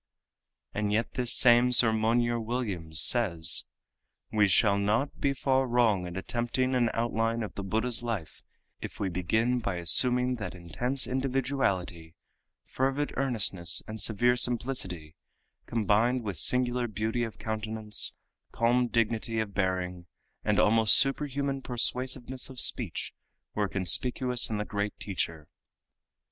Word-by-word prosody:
And 105 Hz, 0 st, -2 dB
yet 110 Hz, +3 st, -1 dB
this 125 Hz, -2 st, +2 dB
same 120 Hz, 0 st, +6 dB
Sir 115 Hz, -2 st, +6 dB
Monier 120 Hz, +2 st, +1 dB
Williams 105 Hz, -10 st, -2 dB
says: 85 Hz, -9 st, +1 dB, 0.7 s
"We 105 Hz, -1 st, +3 dB
shall 100 Hz, +1 st, +3 dB
not 110 Hz, +8 st, -1 dB
be 140 Hz, -, +1 dB
far 135 Hz, -1 st, 0 dB
wrong 115 Hz, -7 st, +1 dB
in 90 Hz, +1 st, -7 dB
attempting 120 Hz, +5 st, -1 dB
an 120 Hz, -2 st, +2 dB
outline 115 Hz, 0 st, -1 dB
of 105 Hz, -, -7 dB
the -, -, -6 dB
Buddha's 110 Hz, +5 st, -2 dB
life 110 Hz, -9 st, -5 dB, 0.4 s
if -, -, -8 dB
we 100 Hz, -, -1 dB
begin 110 Hz, +8 st, 0 dB
by 100 Hz, -5 st, -3 dB
assuming 125 Hz, +9 st, +2 dB
that 110 Hz, -4 st, -6 dB
intense 120 Hz, -, -3 dB
individuality, 125 Hz, -11 st, -2 dB, 0.5 s
fervid 135 Hz, +3 st, -2 dB
earnestness 100 Hz, -10 st, +1 dB
and 110 Hz, -1 st, -6 dB
severe 120 Hz, +3 st, +2 dB
simplicity, 115 Hz, -10 st, -1 dB, 0.5 s
combined 115 Hz, +3 st, +1 dB
with 100 Hz, -6 st, -4 dB
singular 125 Hz, -, +1 dB
beauty 110 Hz, +3 st, -2 dB
of 115 Hz, -2 st, -6 dB
countenance, 110 Hz, -1 st, 0 dB, 0.4 s
calm 120 Hz, +2 st, +1 dB
dignity 115 Hz, -1 st, -1 dB
of 105 Hz, -2 st, -3 dB
bearing, 90 Hz, -2 st, -2 dB, 0.4 s
and 105 Hz, -1 st, +1 dB
almost 110 Hz, +1 st, +5 dB
superhuman 140 Hz, 0 st, 0 dB
persuasiveness 130 Hz, +1 st, -1 dB
of 130 Hz, -2 st, -3 dB
speech, 115 Hz, -9 st, +1 dB, 0.4 s
were 105 Hz, -2 st, -1 dB
conspicuous 125 Hz, +6 st, +1 dB
in 110 Hz, -, -2 dB
the 105 Hz, -, -3 dB
great 100 Hz, 0 st, -3 dB
teacher." 85 Hz, -6 st, -4 dB
115 Hz, 130 wpm, -28 LUFS, 100-125 Hz, 0.7 s, same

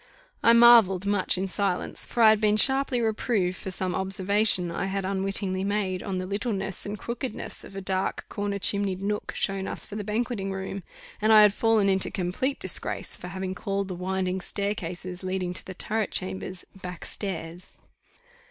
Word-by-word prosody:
I 230 Hz, -, +6 dB
marvelled 230 Hz, -6 st, +7 dB
much 200 Hz, -2 st, +1 dB
in 190 Hz, +1 st, -1 dB
silence 185 Hz, 0 st, -2 dB
for 235 Hz, -, +1 dB
I 220 Hz, -, +9 dB
had 215 Hz, 0 st, +1 dB
been 210 Hz, 0 st, +3 dB
sharply 265 Hz, 0 st, +5 dB
reproved 215 Hz, -4 st, 0 dB
for 190 Hz, -, -7 dB
some 185 Hz, 0 st, -2 dB
observation 190 Hz, -1 st, +2 dB
I 170 Hz, -, -2 dB
had 195 Hz, 0 st, -2 dB
unwittingly 195 Hz, 0 st, -1 dB
made 195 Hz, -2 st, -1 dB
on 195 Hz, -3 st, -3 dB
the 185 Hz, -, -3 dB
littleness 195 Hz, -1 st, -3 dB
and 205 Hz, +1 st, -4 dB
crookedness 240 Hz, +3 st, -5 dB
of 195 Hz, -, -12 dB
a 195 Hz, -, -4 dB
dark, 190 Hz, 0 st, -2 dB
corner 205 Hz, 0 st, -3 dB
chimneyed 200 Hz, -1 st, +1 dB
nook 210 Hz, +1 st, -2 dB
shown 195 Hz, -1 st, -2 dB
us -, -, -3 dB
for 205 Hz, -, -9 dB
the 210 Hz, -, -3 dB
banqueting 210 Hz, -1 st, -2 dB
room; 190 Hz, 0 st, -5 dB, 0.4 s
and 215 Hz, +1 st, +3 dB
I 215 Hz, -1 st, +9 dB
had 210 Hz, -1 st, +5 dB
fallen 225 Hz, -2 st, +2 dB
into 190 Hz, -1 st, +2 dB
complete 195 Hz, +10 st, -2 dB
disgrace -, -, -1 dB
for -, -, -8 dB
having 190 Hz, -1 st, -4 dB
called 195 Hz, +1 st, -3 dB
the -, -, -3 dB
winding 185 Hz, +1 st, -2 dB
staircases, 185 Hz, -2 st, -4 dB
leading 185 Hz, -1 st, -2 dB
to -, -, -3 dB
the 190 Hz, -, -9 dB
turret 215 Hz, +2 st, -1 dB
chambers, 185 Hz, 0 st, -2 dB
_back 180 Hz, -2 st, -8 dB
stairs. 175 Hz, -3 st, -6 dB
195 Hz, 180 wpm, -26 LUFS, 185-210 Hz, 0.4 s, I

